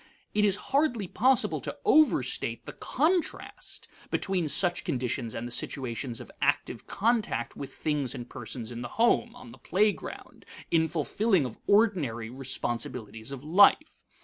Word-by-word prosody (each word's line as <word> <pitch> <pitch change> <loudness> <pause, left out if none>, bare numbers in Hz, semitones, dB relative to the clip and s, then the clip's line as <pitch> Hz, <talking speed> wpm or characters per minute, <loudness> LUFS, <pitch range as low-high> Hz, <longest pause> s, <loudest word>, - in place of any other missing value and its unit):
It 210 - +2
is 200 -2 +5 0.2
hardly 275 -9 +2
possible 255 +7 +2
to - - -5
overstate 310 -7 +3
the - - -7
contrast 345 +2 -2 0.2
between 185 -4 0
such 175 +5 +1
conditions 120 -3 -2
and 115 +1 -4
the - - -8
situations 120 -1 -3
of - - -10
active - - 0
contact 210 - 0
with 140 - -7
things 145 -4 -2
and 120 -2 -7
persons 120 -2 -7
in 120 0 -6
the 120 - -4
home, 235 +1 +3
on 245 -1 -12
the - - -14
playground, 210 +2 -1 0.3
in 160 -1 +4
fulfilling 175 - +1
of 120 -3 -7
ordinary 160 - +2
responsibilities 120 -3 -4
of 135 -1 -7
life. 200 - +5
155 Hz, 145 wpm, -28 LUFS, -, 0.3 s, is